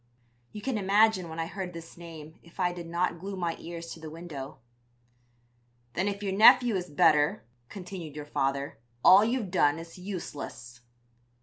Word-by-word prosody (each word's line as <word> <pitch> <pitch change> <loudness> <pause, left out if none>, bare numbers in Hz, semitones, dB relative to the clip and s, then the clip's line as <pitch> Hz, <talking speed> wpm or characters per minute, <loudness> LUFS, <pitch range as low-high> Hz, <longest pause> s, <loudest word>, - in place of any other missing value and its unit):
"You 210 - -9
can 260 -5 -1
imagine 200 -2 +3
when 160 +1 -7
I 165 - 0
heard 185 0 -6
this 165 0 -10
name 160 -2 -11
if 170 +2 -20
I 180 -1 +1
did 175 -1 -8
not 170 0 -1
glue 195 +3 -5
my 170 -2 -1
ears 170 0 -7
to - - -12
the 160 -1 -8
window. 155 -4 -8 1.4
"'Then 190 +3 0
if 200 0 -3
your 195 -1 -1
nephew 240 +2 +7
is 180 -1 -3
better,' 150 -3 +3 0.2
continued 180 -6 -8
your 150 -1 -6
father, 140 -3 -2 0.3
'all 195 +2 +9
you've 230 -4 -1
done 145 -5 +3
is 165 +2 -10
useless.' 145 - -7
175 Hz, 170 wpm, -28 LUFS, 160-195 Hz, 1.4 s, all